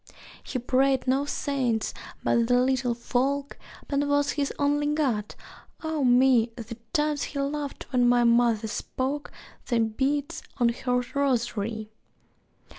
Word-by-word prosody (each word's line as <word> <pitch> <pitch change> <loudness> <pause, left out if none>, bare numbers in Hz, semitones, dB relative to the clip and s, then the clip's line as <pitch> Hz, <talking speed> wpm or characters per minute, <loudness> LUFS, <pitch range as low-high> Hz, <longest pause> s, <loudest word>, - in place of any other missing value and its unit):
He - - -4
prayed 260 +2 +2
no 270 +2 +2
saints 260 -6 -1 0.3
but 235 -1 +2
the 245 0 +4
Little 255 -1 +1
Folk, 275 +4 -1 0.3
Pan 285 0 0
was 285 0 +2
his 285 -2 -1
only 290 0 +1
god; 265 -9 0 0.5
ah 315 -1 -2
me, 245 -2 +4
The 230 -1 -7 0.2
times 300 -1 +1
he 280 - -3
laughed 285 0 -3
when 245 -1 +4
my 245 0 +4
mother 235 -2 +3
spoke 270 +6 -3 0.4
The 240 -2 +1
beads 280 +8 -1 0.2
on 240 -2 +3
her 250 +1 0
rosary! 230 -6 -1
260 Hz, 130 wpm, -26 LUFS, 235-285 Hz, 0.5 s, the